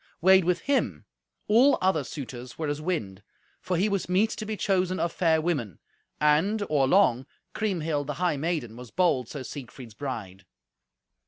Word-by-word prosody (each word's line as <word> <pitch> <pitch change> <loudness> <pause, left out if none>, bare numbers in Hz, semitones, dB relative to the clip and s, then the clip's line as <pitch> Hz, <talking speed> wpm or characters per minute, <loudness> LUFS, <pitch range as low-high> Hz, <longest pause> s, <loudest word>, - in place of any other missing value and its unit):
Weighed 190 +1 +5
with 180 -1 +1
him 280 -1 -1 0.4
all 250 +7 +5
other 185 -6 +1
suitors 130 -3 -8
were 160 - -2
as 145 +1 -3
wind, 110 - -3 0.4
for 180 - -2
he 195 +5 +2
was 200 -3 -2
meet 200 +5 +2
to 215 - -5
be 215 -1 -3
chosen 185 -2 0
of 170 - 0
fair 165 -3 +2
women; 145 - -2 0.4
and, 165 +9 +2
or 140 -3 +3
long, 135 -8 +3 0.3
Kriemhild 165 -9 -1
the 150 - -3
high 175 -1 0
maiden 150 -7 -2
was 125 0 -10
bold 135 -9 +1
Sir 140 -3 -6
Siegfried's 125 -3 -9
bride. 105 -7 -6
160 Hz, 165 wpm, -27 LUFS, 130-185 Hz, 0.4 s, Weighed